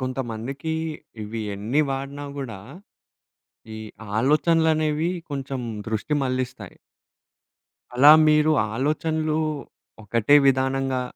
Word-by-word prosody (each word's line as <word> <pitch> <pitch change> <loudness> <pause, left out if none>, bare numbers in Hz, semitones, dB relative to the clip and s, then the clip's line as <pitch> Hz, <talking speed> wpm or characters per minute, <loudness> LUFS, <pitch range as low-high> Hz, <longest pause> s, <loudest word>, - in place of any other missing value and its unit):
కొంతమందికి 130 +4 -4 0.5
ఇవి 110 +2 -5
ఎన్ని 110 +9 0
వాడినా 140 +2 -4
గూడా, 120 -8 -6 1.2
ఈ - - -7 0.4
ఆలోచనలనేవి 155 +3 +2 0.2
కొంచెం 135 -1 -4 0.3
దృష్టి 110 +7 -2
మళ్లిస్తాయి. 130 -1 -4 1.2
అలా 140 +4 +8 0.2
మీరు 150 +1 +4 0.2
ఆలోచనలు, 155 +3 -1 0.7
ఒకటే 115 +6 +2
విధానంగా 135 -1 +1
135 Hz, 80 wpm, -24 LUFS, 125-150 Hz, 1.2 s, అలా